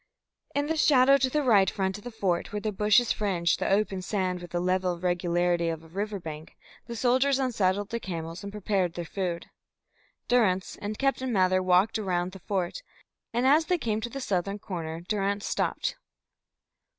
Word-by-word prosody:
In 285 0 +1
the 320 +2 -1
shadow 275 -2 +6
to 260 -1 +1
the 300 +3 0
right 205 -7 +5
front 190 0 -2
of - - -17
the 245 - -6
fort, 195 -7 -1
where 210 - -2
the 215 +1 -2
bushes 210 +4 +3
fringed 180 -5 0
the - - 0
open 195 -1 +1
sand 185 -2 -2
with 175 - -9
the 175 - -2
level 180 -1 0
regularity 175 -1 +1
of 165 -1 -4
a - - -14
river 200 +4 -3
bank, 155 -2 -9 0.3
the 235 - -5
soldiers 260 +4 +3
unsaddled 205 -6 0
their 235 - -2
camels 165 -3 -5
and 200 - -6
prepared 195 -4 -1
their 175 - -4
food. 175 -1 -4 0.8
Durrance 200 -7 +2
and 205 +1 -5
Captain 270 -2 0
Mather 185 -3 +3
walked 185 +4 +3
round 180 -3 -1
the 195 - -11
fort, 185 - -2 0.5
and 240 +2 0
as 300 +4 +5
they 360 - +2
came 220 -7 -2
to 240 - -3
the 275 - -6
southern 200 -2 -1
corner, 165 -5 -5
Durrance 200 +2 -1
stopped. - - -1
195 Hz, 185 wpm, -27 LUFS, 180-230 Hz, 0.8 s, shadow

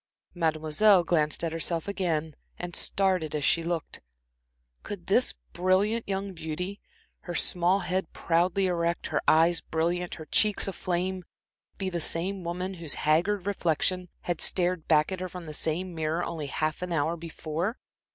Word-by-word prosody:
Mademoiselle 165 +4 +3
glanced 155 -2 +1
at 165 - 0
herself 165 +1 -1
again, 165 -6 -1 0.2
and 180 -1 -5
started 185 -6 +1
as 145 -2 0
she 165 - +3
looked. 165 -1 -3 0.8
Could - - -7
this - - +3 0.2
brilliant 200 +5 +2
young 195 0 -2
beauty, 180 +4 -5 0.4
her 175 - -4
small 180 +5 +2
head 185 -1 -2
proudly 175 +3 +1
erect, 170 -1 0
her - - 0
eyes 165 +2 +5
brilliant, 175 +2 -1
her 155 - -9
cheeks 210 +6 +3
aflame, 185 0 -2 0.5
be 195 - -2
the 175 -2 -2
same 185 +4 0
woman 180 +3 -3
whose 165 -5 -1
haggard 175 +5 +2
reflection 180 -1 0
had 175 -2 -2
stared 180 -2 0
back 155 +1 +4
at 190 - -3
her 185 0 -4
from 180 -1 -8
the 155 - -7
same 170 +4 -1
mirror 160 +1 -1
only 155 -4 -4
half 155 +3 -2
an 180 -1 -3
hour 160 +1 +1
before? 165 +5 -3
175 Hz, 155 wpm, -28 LUFS, 160-185 Hz, 0.8 s, eyes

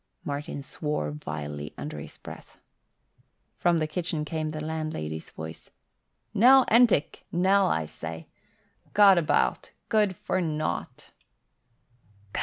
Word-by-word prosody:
Martin 145 0 -4
swore 145 - -3
vilely 75 0 -6
under 75 +2 -6
his 75 - -10
breath. - - -11 1.0
From 175 -1 +3
the 155 - +1
kitchen 155 -1 -3
came 155 0 -2
the 155 0 -5
landlady's 155 - -4
voice. 80 0 -9 0.6
"Nell 255 +5 +7
Entick, 230 -9 +4
Nell, 190 +3 +3
I 80 0 0
say! 80 +1 -7 0.7
Gad 200 -3 +7
about! 165 - +1 0.2
Good 210 -4 +2
for 185 - -1
nought!" 155 -2 -3
155 Hz, 110 wpm, -27 LUFS, -, 1.0 s, Nell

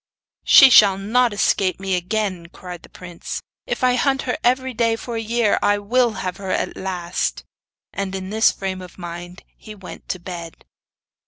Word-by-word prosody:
'She 270 -1 +8
shall 200 -4 +7
not 235 +5 +2
escape 195 -2 +1
me 195 -1 -2
again,' 185 -1 -2
cried 180 0 -10
the - - -16
prince. 175 -2 -7 0.3
'If - - -3
I 250 0 +4
hunt 270 +2 +1
her 250 - -1
every 255 +1 +1
day 230 -1 +1
for 235 +1 -7
a - - -1
year, 225 -1 +1
I 205 0 +3
will 235 +3 +1
have 180 -1 -3
her 195 -1 -7
at - - -1
last.' 180 -2 -3 0.5
And 195 -1 -3
in 190 0 -6
this 220 +1 +4
frame 190 -1 -5
of 180 -1 -12
mind 175 0 -8
he 215 - -12
went 190 -3 -12
to - - -2
bed. 170 -2 -9
195 Hz, 180 wpm, -21 LUFS, 180-230 Hz, 0.5 s, She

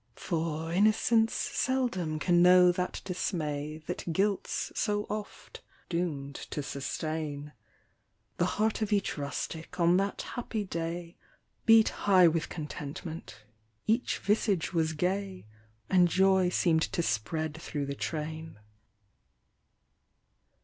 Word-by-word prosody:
For 165 -1 -2
innocence 220 +3 +3
seldom 230 -12 -1
can 175 +2 +3
know 180 0 +7
that 180 0 -3
dismay 155 -4 -3
That 175 0 -4
guilt's 195 +3 0
so 205 -1 0
oft 210 -1 -7 0.3
doom'd 155 -6 -2 0.2
to 150 - -3
sustain; 150 +1 -4 0.8
The - - +2
heart 220 +1 +1
of 215 0 -1
each 200 -1 +1
rustic 160 +4 -5
on 170 +1 +5
that 200 +1 -1
happy 230 -3 -3
day, 170 -1 -5 0.5
Beat 225 -1 +7
high 185 -3 +5
with 165 0 0
contentment, 150 - -7 0.4
each 225 +3 +1
visage 200 -4 0
was 160 -2 +1
gay, 185 - -2 0.4
And 180 -2 +5
joy 190 +1 +3
seem'd 165 -2 +2
to 170 - 0
spread 150 +7 -1
thro' 145 -4 -3
the 140 - -3
train. 155 +1 -5
175 Hz, 115 wpm, -30 LUFS, 155-195 Hz, 0.8 s, know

